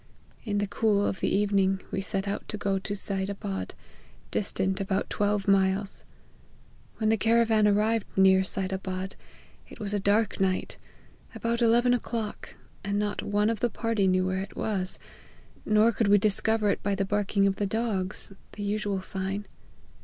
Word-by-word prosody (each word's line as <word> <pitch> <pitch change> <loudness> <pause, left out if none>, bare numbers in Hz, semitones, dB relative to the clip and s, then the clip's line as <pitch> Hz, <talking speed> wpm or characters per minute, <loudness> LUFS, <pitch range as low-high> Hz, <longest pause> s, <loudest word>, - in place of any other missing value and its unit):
In 205 -2 -1
the 205 - +1
cool 205 0 +1
of 190 - -2
the - - 0
evening 195 -1 +2
we 195 - -1
set 195 0 -1
out 200 - -3
to 210 - -4
go 195 -1 0
to 205 +1 -3
Seid 195 -1 0
Abad, 95 - -5 0.6
distant 190 -1 -1
about 195 0 -1
twelve 205 -1 0
miles. 195 0 +2 0.9
When 215 -1 +1
the 220 - +3
caravan 225 0 +3
arrived 215 +1 +2
near 190 0 +6
Seid 190 0 -2
Abad, 190 0 -4 0.5
it - - -12
was 205 -1 -3
a 205 - +1
dark 205 +2 +1
night, 190 -1 -1 0.6
about 235 +1 -1
eleven 240 +1 +4
o'clock, 230 -3 -4 0.3
and 200 +1 -1
not 205 0 -1
one 210 +2 +1
of 225 - -3
the 240 - +1
party 225 -2 0
knew 185 0 +2
where 185 0 -1
it 195 - -8
was, 190 -4 -1 0.7
nor 215 +2 +4
could 225 -1 0
we 205 +1 +6
discover 215 +1 +2
it - - -3
by 200 0 0
the 195 0 0
barking 200 0 +1
of 195 -1 +1
the 205 - 0
dogs, 205 -3 -2 0.2
the 205 - -6
usual 205 -2 -1
sign. 195 +2 -3
200 Hz, 170 wpm, -27 LUFS, 195-215 Hz, 0.9 s, near